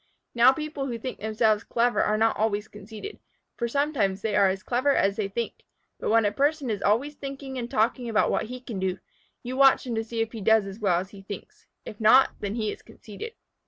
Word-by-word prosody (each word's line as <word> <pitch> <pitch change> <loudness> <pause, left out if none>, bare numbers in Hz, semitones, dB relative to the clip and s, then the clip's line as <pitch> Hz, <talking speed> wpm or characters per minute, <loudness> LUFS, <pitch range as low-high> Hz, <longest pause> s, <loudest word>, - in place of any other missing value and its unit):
Now 240 +2 +7
people 300 -1 -4
who 240 -3 -3
think 255 +3 -6
themselves 215 0 +1
clever 240 +1 +1
are 215 - +1
not 225 +1 +2
always 210 -1 0
conceited, 210 - -9 0.4
for 235 - -2
sometimes 235 -8 0
they 215 -2 0
are 200 -1 +5
as 190 +1 -3
clever 260 +3 +1
as 195 0 +2
they 210 -2 -1
think. 230 +4 -4 0.4
But - - -2
when 225 0 +4
a 205 - +2
person 285 +1 0
is 205 - -3
always 240 +9 +1
thinking 275 -1 -7
and 240 0 -5
talking 235 +2 0
about 220 - +2
what - - 0
he 250 +2 -8
can 230 -6 -6
do, 185 0 -1 0.5
you 250 +1 -4
watch 270 0 +5
him 245 - -3
to 225 0 -1
see 230 +1 -5
if 225 0 -2
he 225 - -7
does 220 +1 +4
as 195 +2 -8
well 185 -5 +2
as 190 +2 -7
he 200 - -12
thinks. 420 - -10 0.2
If 210 - -9
not, 240 +5 +6
then 205 +1 -3
he 215 -3 -1
is - - -9
conceited. 225 - -10
225 Hz, 230 wpm, -26 LUFS, 210-260 Hz, 0.5 s, Now